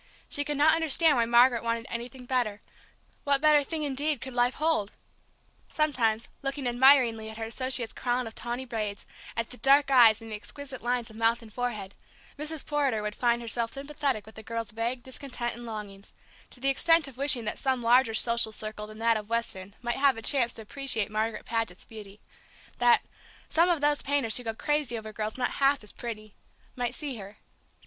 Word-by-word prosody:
She 290 - -1
could 295 0 -3
not 305 +2 +5
understand 320 -1 +6
why 235 -2 +1
Margaret 240 0 +5
wanted 230 0 -2
anything 245 +2 -7
better; 240 -5 -1 0.6
what 280 -1 +2
better 300 0 +4
thing 315 +1 -4
indeed 290 0 -1
could 260 +1 -8
life 245 +1 +1
hold! 305 -10 0 0.8
Sometimes, 235 -8 0
looking 275 0 -4
admiringly 245 -3 +4
at 220 - -9
her 225 - -5
associate's 245 +1 -1
crown 245 0 -1
of 225 - -8
tawny 240 +3 -5
braids, 215 -4 -4 0.3
at 230 0 -2
the 250 - -8
dark 275 +1 +4
eyes 230 -4 +7
and 225 -1 -11
the - - -3
exquisite 270 +5 -9
lines 240 -1 -2
of 220 - -13
mouth 230 +1 +1
and 220 -2 -14
forehead, 220 -6 -4 0.4
Mrs. 305 0 -4
Porter 275 -8 0
would 210 0 -3
find 235 +1 0
herself 230 0 0
sympathetic 280 -5 -3
with 220 - -14
the 220 - -10
girl's 230 0 -5
vague 235 +3 -3
discontent 260 -2 -4
and 240 0 -9
longings, 205 -3 -8 0.3
to - - -12
the 270 +2 0
extent 330 +3 +3
of 270 - -11
wishing 275 -4 +4
that 215 - -3
some 265 -2 0
larger 235 -1 +4
social 235 -1 +4
circle 215 0 -4
than 215 0 -12
that 230 0 +2
of 210 0 -8
Weston 205 -4 -2
might 240 0 -2
have 275 -2 +3
a 225 - -8
chance 240 -1 +4
to 225 - -7
appreciate 225 -3 -1
Margaret 215 0 -2
Paget's 225 -6 -3
beauty, 210 -2 -12 0.6
that 240 -1 +4 0.5
"some 335 +2 +3
of 335 -4 +1
those 295 0 +2
painters 275 -6 +3
who 250 - -4
go 225 -1 -4
crazy 295 -3 -1
over 215 -1 -8
girls 215 +2 -4
not 250 - -1
half 275 -2 +3
as 210 - -9
pretty" 215 -3 -8 0.4
might 245 -1 -2
see 280 -5 -5
her. 200 0 -11
240 Hz, 195 wpm, -28 LUFS, 220-275 Hz, 0.8 s, eyes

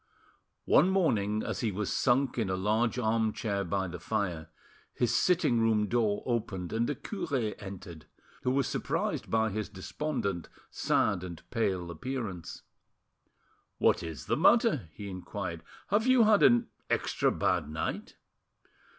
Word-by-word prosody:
One 180 - +5
morning, 110 - +1
as - - -3
he 115 -4 0
was 100 +1 -2
sunk 130 0 +2
in 110 -4 0
a 95 - 0
large 110 +6 +1
armchair 110 -3 0
by 95 +1 -1
the 90 0 -7
fire, 90 -6 -2 0.5
his 120 - +1
sitting 170 -10 +3
room 110 -2 +3
door 110 -2 +1
opened, 105 -7 -2
and 115 +1 +1
the 145 - -1
cure 140 - -2
entered, 90 -6 -9 0.3
who - - 0
was 135 +1 +2
surprised - - -2
by 110 -1 +2
his 105 +1 -3
despondent, 100 - -3 0.2
sad, 100 -4 +1
and 85 -3 -8
pale 95 -7 -1
appearance. 100 -2 -5 1.1
"What - - +3
is 80 -3 -6
the - - +1
matter?" 80 - +4
he 100 +6 -8
inquired, 95 -2 -5 0.3
"Have 215 +5 +2
you 255 -2 +6
had 215 -1 +5
an 120 -1 +5 0.2
extra - - +1
bad - - 0
night?" 80 +1 -4
110 Hz, 140 wpm, -30 LUFS, 95-120 Hz, 1.1 s, you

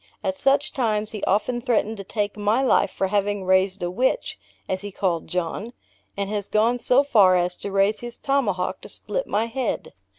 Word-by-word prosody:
At 190 -2 -1
such 275 +6 +2
times 215 -4 0
he 210 - -6
often 240 +5 +1
threatened 225 -3 0
to 195 - -6
take 205 +1 -2
my 210 +5 +1
life 260 - +3
for - - -2
having 205 0 0
raised 190 0 +2
a 175 - -1
witch, 260 - -1 0.3
(as 185 0 -2
he 205 0 -6
called 180 -4 -1
John,) 180 +6 -3 0.4
and 200 0 -1
has 205 -1 -3
gone 230 +3 +2
so 255 +3 +4
far 200 -10 +5
as 180 0 0
to - - -5
raise 195 +2 +2
his 240 0 -7
tomahawk 230 -10 -1
to - - -11
split - - -4
my 215 +2 0
head. 245 +1 -3
210 Hz, 195 wpm, -23 LUFS, 190-240 Hz, 0.4 s, far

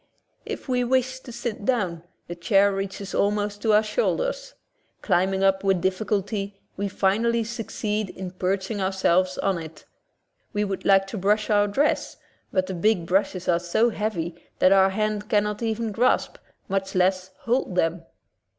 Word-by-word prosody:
If - - -6
we 250 -1 +1
wish 260 +1 +1
to 255 - -11
sit 230 -3 -5
down, 195 -9 0 0.2
the 175 - -6
chair 195 +3 +3
reaches 195 0 -5
almost 205 0 0
to 220 0 +2
our 210 +1 +5
shoulders. - - -1 0.5
Climbing 190 +2 +1
up 195 0 +3
with 195 -2 +2
difficulty, 195 +1 -2 0.2
we 200 +1 -2
finally 225 +4 +1
succeed 215 -3 -3
in 185 -1 -7
perch 190 +2 -2
ing 205 -3 -2
ourselves 185 -1 +1
on 195 -3 0
it. 160 -1 -10 0.7
We 210 -1 +1
would 195 -2 -4
like 195 -1 +5
to 195 +2 -6
brush 210 +3 +1
our 205 0 +4
dress, 275 +9 0 0.3
but 185 -1 +1
the 190 - -5
big 180 0 +1
brushes 185 0 0
are 170 -1 +3
so 200 +7 +1
heavy 200 -6 -2 0.2
that 185 - +4
our 195 0 +6
hand 210 +1 -2
cannot 210 0 +1
even 225 -1 -1
grasp, 250 - +1 0.3
much 195 0 -2
less 185 0 +2
hold, 235 -6 0
them. 165 -1 0
200 Hz, 160 wpm, -24 LUFS, 190-220 Hz, 0.7 s, our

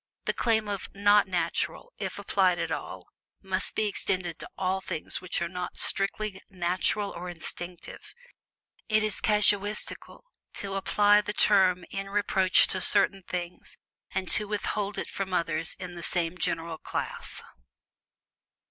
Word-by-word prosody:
The - - +1
claim 220 -2 +1
of 200 -2 -4
"not 205 +1 +5
natural," 180 - -2
if - - -4
applied - - +2
at - - -2
all, - - -5 0.3
must - - -2
be 215 - +1
extended 185 -4 -1
to - - -8
ALL 190 0 0
things 155 - -3
which 180 -1 -2
are - - -1
not 180 +1 -5
strictly 195 0 0
"natural" 185 +3 0
or 180 +1 -6
instinctive 175 +1 -7 0.7
it 215 0 +3
is 215 -2 -1
casuistical 210 0 +1 0.3
to 195 -1 -4
apply 205 +1 +4
the 210 0 -4
term 185 -4 +4
in 195 0 -4
reproach 195 -2 +4
to 185 - -1
certain 195 -1 +4
things 175 -1 -5 0.3
and 190 -1 -3
to 210 - +2
withhold 205 0 -2
it - - -3
from 190 -2 -3
others 165 -2 0
in 180 -2 -7
the 170 - -8
same 170 0 0
general 165 -2 -2
class. - - -5
190 Hz, 145 wpm, -28 LUFS, 180-205 Hz, 0.7 s, not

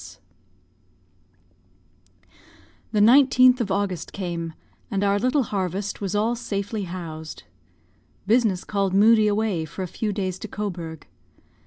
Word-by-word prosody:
S.S. - - -12 2.7
The 215 - +1
19th 255 +1 +6
of 215 - -2
August 190 -3 -2
came, 170 -4 -4 0.4
and 200 0 -1
our 200 0 +2
little 255 +5 +2
harvest 195 -1 -3
was 195 0 -2
all 220 +3 +1
safely 205 -2 -4
housed. 160 - -7 0.8
Business 215 -4 +2
called 195 -2 -1
Moodie 215 +1 +5
away 205 -5 0
for 165 +5 -6
a - - -4
few 210 +4 -3
days 190 -2 -3
to - - -6
Cobourg. 175 -7 -6
200 Hz, 125 wpm, -24 LUFS, 185-220 Hz, 2.7 s, 19th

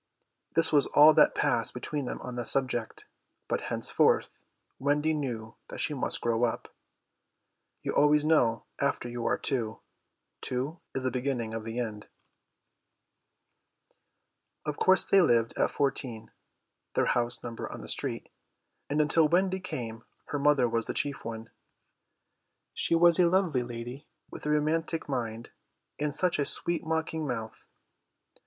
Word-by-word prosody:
This 165 0 +2
was 145 -2 +4
all 150 +2 +7
that - - +5
passed - - 0
between 150 -3 -3
them - - -4
on 125 - -6
the 120 - -2
subject, 120 -2 -1 0.4
but - - -1
henceforth - - +1 0.4
Wendy 150 +3 +1
knew 120 -7 -4
that - - -8
she 155 - -1
must 135 - -2
grow 115 0 +1
up. 120 - -2 1.1
You - - -1
always 150 +1 +4
know 120 -8 +3 0.2
after 140 -3 0
you 120 -1 -3
are - - +2
two. 115 -6 -2 0.6
Two 135 +7 -3 0.2
is 130 - -1
the 130 - 0
beginning 125 -3 -2
of 115 -1 -4
the 115 +1 -5
end. 110 -4 -4 2.6
Of 150 -1 -3
course 190 0 +4
they 195 - +5
lived 115 -8 +2
at - - +2
14, 125 -5 -2 0.6
and 120 -1 -1 1.3
until 155 +1 +3
Wendy 185 +3 +2
came 115 -10 -6 0.2
her 145 - -3
mother 140 -3 +4
was 115 -1 -1
the - - -3
chief 145 -1 -1
one. 115 0 -7 1.2
She - - +2
was 170 0 +6
a 175 -1 +5
lovely 175 -8 +2
lady, 120 +3 -7 0.2
with - - -7
a - - 0
romantic 160 +2 0
mind 120 -4 -4 0.5
and 150 0 -1
such 180 -4 +1
a 145 - +2
sweet 170 +3 0
mocking 160 -1 -2
mouth. 115 -4 -5
135 Hz, 135 wpm, -29 LUFS, 120-155 Hz, 2.6 s, all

